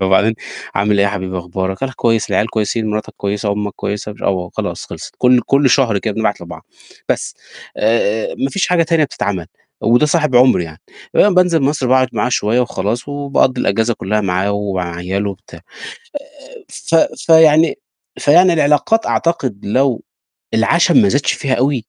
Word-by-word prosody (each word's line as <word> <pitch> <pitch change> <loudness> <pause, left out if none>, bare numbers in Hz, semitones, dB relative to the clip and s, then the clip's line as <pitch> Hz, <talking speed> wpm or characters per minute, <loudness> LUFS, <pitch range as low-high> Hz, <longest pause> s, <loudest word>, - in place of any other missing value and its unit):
فبعدين 95 +4 +2 0.4
"عامل 100 +1 +1
إيه 100 - +3
حبيبي 95 -2 -3
أخبارك؟"، 95 +4 -4
"أنا 135 -1 -2
كويس."، 115 -2 0
"العيال 105 - +1
كويسين؟ 110 +1 -1
مراتك 105 0 -4
كويسة؟ 100 +1 -2
أمّك 105 0 -3
كويسة؟"، 105 +1 -4
مش - - -16
"آه"، - - +2
وخلاص 90 -2 -4
خلصِت، - - -9
كل 125 -1 +4
كل 140 -1 +3
شهر 120 -6 +2
كده 105 0 -3
بنبعت 110 -3 -1
لبعض. 85 0 -11 0.4
بس، - - -2 0.4
آآ، 110 0 0
آآ، - - -7
ما 135 - -1
فيش 195 - 0
حاجة 180 -2 +3
تانية 165 -1 +2
بتتعمل، 95 - -4 0.3
وده 120 +6 +3
صاحب 150 -5 +1
عمري 125 -8 +4
يعني. 80 -1 -12 0.4
آآ، 205 - +6
بانزل 180 -3 +3
مصر 140 -1 0
باقعد 130 0 +3
معاه - - -1
شوية 120 0 +1
وخلاص، 120 +1 -3
وباقضّي 140 -3 0
الأجازة 115 +4 0
كلّها 105 +2 -2
معاه 95 +1 -1
ومع 95 -4 -3
عياله 95 +3 -2
وبتاع. 100 +2 -13 0.9
آآ، 480 -4 -14
ف 165 - -3 0.3
فيعني 160 - +5 0.4
فيعني 175 +5 +5
العلاقات 150 +8 +2
أعتقد 135 -11 -1
لو 130 +3 0 0.5
العشم 170 +10 +3
ما 205 - +3
زادش 140 -5 +1
فيها 135 -2 -2
أوي 130 -1 0
115 Hz, 165 wpm, -16 LUFS, 100-145 Hz, 0.9 s, آآ